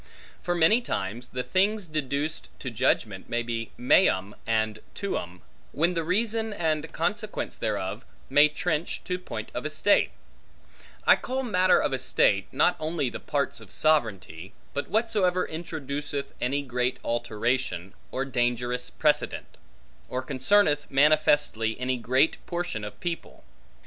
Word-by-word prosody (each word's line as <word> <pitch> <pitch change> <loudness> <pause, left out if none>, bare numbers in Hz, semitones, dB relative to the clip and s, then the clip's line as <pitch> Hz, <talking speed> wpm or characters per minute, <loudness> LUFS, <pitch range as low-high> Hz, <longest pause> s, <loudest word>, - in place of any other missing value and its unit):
For 175 - -1
many 175 +8 +5
times 115 - -3
the 125 -1 -3
things 200 +5 +1
deduced 150 -1 -2
to 130 - -5
judgment 110 -4 0
may 120 0 0
be 115 -2 -3
meum 105 - +3
and 110 -1 0 0.2
tuum, 90 - -4 0.3
when 170 +4 +2
the 165 -2 -1
reason 220 +5 0
and 160 -4 -1
consequence 210 +6 -2
thereof - - -3 0.2
may 145 +1 +6
trench 155 +1 -2
to 180 -1 -2
point 180 - -6
of - - -3
estate: - - +2 1.0
I - - +8
call 260 +1 -3
matter 185 -6 +4
of 135 - 0
estate, 105 -6 +2
not 150 +6 +3
only 155 -5 -1
the - - -6
parts - - -2
of - - -13
sovereignty, 105 - 0 0.2
but 145 - -3
whatsoever 205 -5 +2
introduceth 145 -3 -4 0.2
any 140 +3 0
great 125 -1 -1
alteration, 115 -5 -1 0.2
or 135 +1 -1
dangerous 125 -1 0
precedent; 150 -1 0 0.5
or 130 +1 -2
concerneth 145 +3 +2
manifestly 145 -6 +3
any 130 0 0
great 130 +6 +2
portion 175 - -3
of 105 0 -7
people. 170 -1 -5
140 Hz, 135 wpm, -27 LUFS, 120-175 Hz, 1.0 s, I